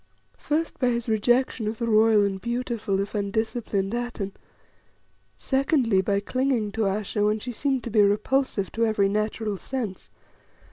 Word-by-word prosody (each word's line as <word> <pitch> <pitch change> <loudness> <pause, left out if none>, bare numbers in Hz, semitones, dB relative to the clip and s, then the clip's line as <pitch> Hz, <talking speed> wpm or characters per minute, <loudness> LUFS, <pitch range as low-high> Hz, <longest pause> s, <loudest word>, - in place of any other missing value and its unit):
First, 320 +2 -2
by 255 - +2
his 235 -1 0
rejection 235 +1 +1
of 220 +1 -3
the 235 - -2
royal 220 -2 +4
and 195 -1 -3
beautiful, 235 -4 -2
if 200 0 -3
undisciplined, 205 -1 -1
Atene. 240 -5 -3 1.1
Secondly, 265 -7 +2
by 200 +1 +1
clinging 250 -1 0
to 220 +1 -1
Ayesha 205 +1 -1
when 210 +1 +2
she 245 +3 -6
seemed 265 +1 -1
to 235 - -5
be 210 -1 +5
repulsive 210 +1 +1
to 230 - -1
every 205 -3 +2
natural 215 0 -1
sense. 230 -4 -5
220 Hz, 150 wpm, -25 LUFS, 205-245 Hz, 1.1 s, be